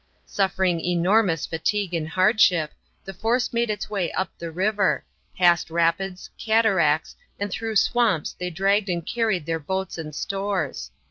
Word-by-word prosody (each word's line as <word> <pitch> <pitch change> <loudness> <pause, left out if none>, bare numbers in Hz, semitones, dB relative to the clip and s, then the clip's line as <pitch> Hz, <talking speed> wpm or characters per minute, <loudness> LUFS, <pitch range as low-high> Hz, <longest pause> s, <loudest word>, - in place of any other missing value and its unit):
Suffering 190 -3 0
enormous 180 0 +2
fatigue 180 +4 -2
and 160 -2 -2
hardship, 185 -4 +3 0.3
the 195 - -7
force 230 +7 0
made 235 0 +1
its 210 -1 -3
way 195 -5 -2
up 190 - -2
the 170 - -5
river; 195 +4 0 0.3
past 175 -3 +3
rapids, 170 +3 0
cataracts, 195 -9 +2 0.2
and 200 0 -3
through 225 +2 -3
swamps 215 -6 +2
they 180 0 -2
dragged 195 +4 +1
and 170 -2 -2
carried 220 -9 0
their 165 0 -2
boats 190 +3 -4
and 155 -2 -7
stores. 195 -6 -3
190 Hz, 145 wpm, -24 LUFS, 170-210 Hz, 0.3 s, hardship